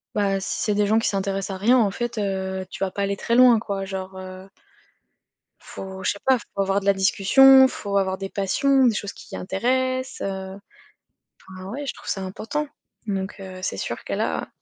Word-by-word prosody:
bah, 195 -2 +1
si 190 - -4
c'est 210 - 0
des 205 0 +2
gens 215 +2 +3
qui 225 - -1
s'intéressent 195 0 -2
à - - -8
rien 240 +6 +4
en 215 -5 +3
fait, 240 +3 -4
heu, 190 -1 -2
tu - - -4
vas 190 - -4
pas 200 - -4
aller 200 0 -1
très 235 - 0
loin, 245 -2 +7
quoi, 200 -3 -4
genre, 190 -1 -6
heu 185 +1 -10 1.1
faut 190 0 -9
je - - +2
sais 200 - -10
pas, 265 -1 +5
il - - -4 0.2
faut 200 - -2
avoir 195 +1 +1
de 200 - -9
la 200 - +5
discussion, 265 +8 +6
faut 200 -5 -4
avoir 190 -1 -1
des 195 - -4
passions, 265 +7 +2
des 230 - +3
choses 205 -1 -4
qui - - -10
intéressent, 255 +7 -1
heu. 190 0 -5 0.9
Enfin 185 0 -9
ouais, 285 +6 -5
je - - -3
trouve - - -12
ça 195 - -2
important. 225 +10 -4 0.4
Donc 195 -2 -3
heu, 185 -1 -8
c'est 185 - -2
sûr - - -5
que - - -6
là - - -2
195 Hz, 215 wpm, -23 LUFS, 190-235 Hz, 1.1 s, loin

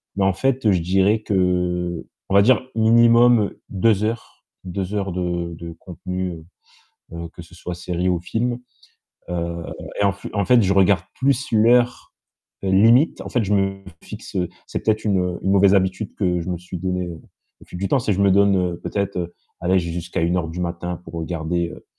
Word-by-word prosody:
mais 100 - +1
en 95 - +3
fait, 130 -1 +1
je 90 -3 +2
dirais 95 +5 +2
que, 105 - -3
heu, 90 -1 0 0.2
on 95 - +1
va 100 - +8
dire 125 +5 +4
minimum 115 0 +5 0.2
2 105 +1 +2
heures, 115 +1 -4 0.2
2 95 +2 -4
heures 100 -2 -2
de 85 -1 -2
de 85 0 -8
contenu, 90 +1 -5
heu 80 -1 -11 0.7
heu, 85 0 -6
que - - -10
ce 85 - -16
soit 90 0 -6
série 90 +1 -2
ou 90 -2 +1
films, 120 +7 -2 0.7
heu 85 -1 -3 0.4
et - - +3
en 100 - +3
f 100 - -11
en 100 -2 +1
fait 125 -2 +5
je 95 -1 +2
regarde 95 -2 +4
plus 135 +1 0
l'heure 120 +2 +3 0.5
limite. 110 +9 +4
En - - -7
fait 120 -4 +1
je 100 - -1
me 95 0 -1 0.2
fixe - - -9 0.3
c'est - - -4
peut-être 110 0 +1
une 90 -4 0
une 95 - 0
mauvaise 100 0 +5
habitude 95 +2 0
que 90 -3 0
je 85 - -6
me 90 - -1
suis 90 +1 -8
donné 90 0 -2 0.5
au - - -15
fil 90 - -8
du 95 +1 -2
temps. 140 - +3
C'est 115 -4 0
que 95 - -2
je 100 - +3
me 100 - +4
donne 95 -3 +3
peut-être 90 -4 -3 0.3
allez 95 +2 +2
j'ai 85 0 -4
jusqu'à 85 0 -4
01:00 85 0 0
du 85 +2 -6
matin 85 0 -4
pour 80 - -11
regarder, 85 +1 -2
heu - - -12
95 Hz, 195 wpm, -21 LUFS, 90-105 Hz, 0.7 s, va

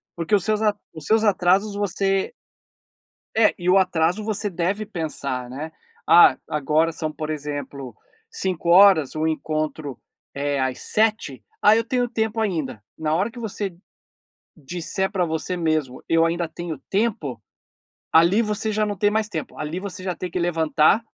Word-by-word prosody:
porque 170 +4 -4
os 195 - +1
seus 215 -1 +1
a 210 -1 +2 0.2
os 155 -2 -9
seus 220 0 +3
atrasos 200 0 +2
você 195 -1 0 1.0
É, 220 -1 +4
e 180 0 -1
o 185 - +6
atraso 180 +1 +1
você 210 -1 -2
deve 185 +4 -2
pensar, 140 -8 -4
né: 145 +5 -6 0.4
"Ah, 175 - +7
agora 155 +3 +1
são, 155 -1 -4
por 155 0 -6
exemplo, 145 -4 -5 0.4
17:00, 185 - +4
o 155 +1 0
encontro 155 -3 -3 0.3
é 140 0 -1
às 130 -1 -1
19:00, 215 - 0 0.2
ah 210 +1 +6
eu 230 - +2
tenho 245 0 -1
tempo 220 -1 -1
ainda". 160 - -2
Na 155 -1 -1
hora 195 +6 +1
que 245 - -10
você 205 -4 -4 0.8
disser 175 +6 -3
pra 190 -3 0
você 160 +3 -3
mesmo: 155 -6 -1
"Eu 165 0 +4
ainda 170 0 -1
tenho 165 -3 -6
tempo". 190 - -1 0.7
Ali 170 +7 +5
você 215 0 -2
já 215 0 +1
não 205 -1 -3
tem 205 +2 +3
mais 215 0 -1
tempo, 160 -6 -6
ali 155 +4 -4
você 190 -1 -7
já 185 -1 -2
tem 180 - -5
que 170 - -4
levantar, 165 +2 +3
175 Hz, 160 wpm, -23 LUFS, 155-205 Hz, 1.0 s, Ah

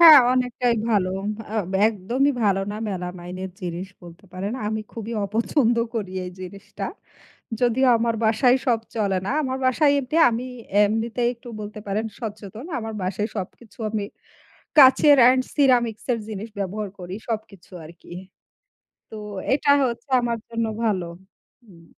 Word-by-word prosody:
হ্যাঁ, 320 -4 +11
অনেকটাই 250 -1 +1 0.2
ভালো। 195 -4 +2 0.4
আ - - -4 0.3
একদমই 240 +8 0
ভালো 195 -1 +3
না - - -5
মেলামাইনের 180 0 -5
জিনিস 180 +1 -5
বলতে 175 +2 -13
পারেন। 190 +3 -4
আমি 220 +1 -1
খুবই 230 0 -6
অপছন্দ 230 +4 +1 0.2
করি 195 -5 -3
এই 180 - -6
জিনিসটা। 195 +2 -8 0.8
যদিও 250 +2 +3
আমার 230 0 +1
বাসায় 245 +3 +4
সব 235 -3 +3 0.2
চলে 200 -3 +1
না। - - -1
আমার 260 -1 -2
বাসায় 285 +3 +4
এঁটে 275 +4 -3
আমি 235 +2 -3 0.4
এমনিতে 225 +3 -1
একটু 235 +1 -14
বলতে 210 0 -7
পারেন 205 +2 -1 0.2
সচেতন। 215 - -7
আমার 225 -1 -5
বাসায় 195 +3 -1
সবকিছু 205 +3 -8
আমি 215 -1 -2 0.8
কাঁচের 285 +1 +8
এন্ড 255 0 +3
সিরামিক্সের 245 -4 +2
জিনিস 215 +1 -6
ব্যবহার 200 +2 -3
করি 180 0 -7 0.2
সবকিছু 210 -5 -5
আরকি। 170 +2 -15 1.0
তো 220 - -8 0.4
এটা 285 +1 +1
হচ্ছে 235 +1 -3
আমার 235 -1 -1
জন্য 230 -1 -1 0.2
ভালো। 195 -5 +1 0.6
হুম। 175 -6 -17
220 Hz, 140 wpm, -23 LUFS, 195-245 Hz, 1.0 s, হ্যাঁ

